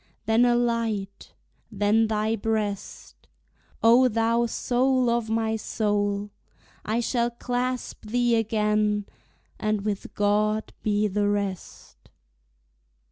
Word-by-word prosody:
Then 225 +2 +4
a 240 -1 +3
light, 230 -5 -2 0.4
then 210 +2 +2
thy 215 +1 0
breast, 215 -2 -4 0.6
O 240 +3 +6
thou 230 +1 +1
soul 250 +1 +1
of 235 -2 -1
my 225 0 0
soul! 205 -2 -1 0.5
I 225 +3 -1
shall 235 0 0
clasp 245 -1 -4
thee 240 +1 +2
again, 210 -2 +1 0.5
And 215 -1 0
with 205 -1 -4
God 210 +1 +1
be 210 0 +1
the 205 +1 0
rest! 200 -2 -5
220 Hz, 105 wpm, -25 LUFS, 210-235 Hz, 0.6 s, O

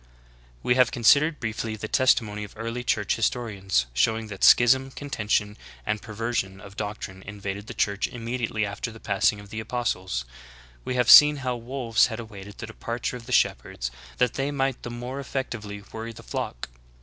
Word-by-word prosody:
(_5/ - - -29 0.6
We 125 - +3
have 125 -1 +4
considered 145 +6 +4
briefly 110 -1 -3
the 110 0 -5
testimony 110 -4 +2
of 105 - -10
early 115 +2 -4
church 105 -4 0
historians 100 - 0
showing 110 - +1
that 100 -2 -7
schism, 130 +2 +6
contention, 105 -7 -1 0.3
and 105 -1 -1
per 110 +1 -9
^ - - -11
version 110 -4 -2
of 100 0 -12
doctrine 100 -3 -5
invaded 100 0 -6
the - - -7
Church 100 0 0
immicdiately 115 -2 -2
after 100 +3 -4
the 115 - -12
passing 100 0 +1
of 100 -1 -13
the 110 - -4
apostles; 100 - -2 0.6
we 130 - -3
have 125 -2 +2
seen 150 0 +10
how 125 -1 0
wolves 120 -1 +1
had 110 -1 -6
awaited 105 -3 -9
the - - -6
departure 115 +2 -4
of 120 -1 -10
the - - -7
shepherds - - +1 0.3
that 125 - +2
they 135 +1 -1
might 135 -2 -1
the - - -6
more 120 +3 -5
effectively 115 -7 -5
worry 115 +1 -6
the - - -12
flock. - - -4
115 Hz, 185 wpm, -26 LUFS, 105-125 Hz, 0.6 s, seen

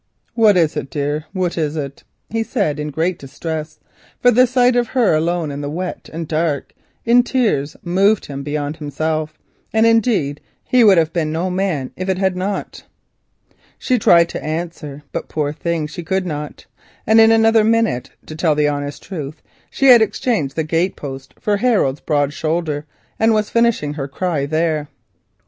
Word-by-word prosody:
"What 215 -4 +4
is 165 -3 +2
it, 135 - -4
dear, 145 +2 -2
what 180 -3 -2
is 150 -1 -1
it?" 140 -3 -5 0.3
he 225 +1 0
said 200 - -1
in 150 0 -3
great 165 +5 -1
distress, 155 +3 -6 0.4
for 245 - +5
the 250 +2 +5
sight 250 0 +3
of 240 -1 +2
her 235 -6 +2
alone 165 0 0
in 140 +1 -5
the 145 - -4
wet 180 +4 -5
and 165 0 -5
dark, 155 -3 -1 0.3
and 235 +1 +5
in - - +5
tears, 210 - 0
moved 195 +4 +2
him 140 -1 -6
beyond 145 +1 -3
himself. 155 +1 -3 0.3
Indeed 220 - +2 0.2
he 250 -1 +3
would 200 -4 +6
have 160 -1 +2
been 160 -3 -1
no 170 +4 -1
man 180 -8 -1
if 185 +1 -4
it 190 - +1
had 190 -1 +1
not. 195 +2 -4 1.0
She 255 -2 0
tried 170 -4 +5
to - - -6
answer, 155 -2 -5
but - - -5 0.6
she 165 +4 -7
could 190 +2 -1
not, 150 -3 -6 0.4
and 220 +1 +6
in 225 0 +6
another 225 0 +4
minute, 225 - +1 0.2
to 155 - -8
tell 160 -1 +1
the 150 0 +2
honest 145 0 -4
truth, 155 -5 -7 0.3
she 275 - -1
had 240 -2 +9
exchanged 210 - 0
the 160 - 0
gate 165 +4 0
post 135 -2 -8
for 205 -1 0
Harold's 200 - +1
broad 145 -2 0
shoulder, 155 -1 -2 0.3
and 225 0 +4
was 215 -1 -1
finishing 230 -11 +1
her 140 -2 -4
"cry" 145 0 -2
there. 155 -1 0
165 Hz, 175 wpm, -19 LUFS, 150-210 Hz, 1.0 s, had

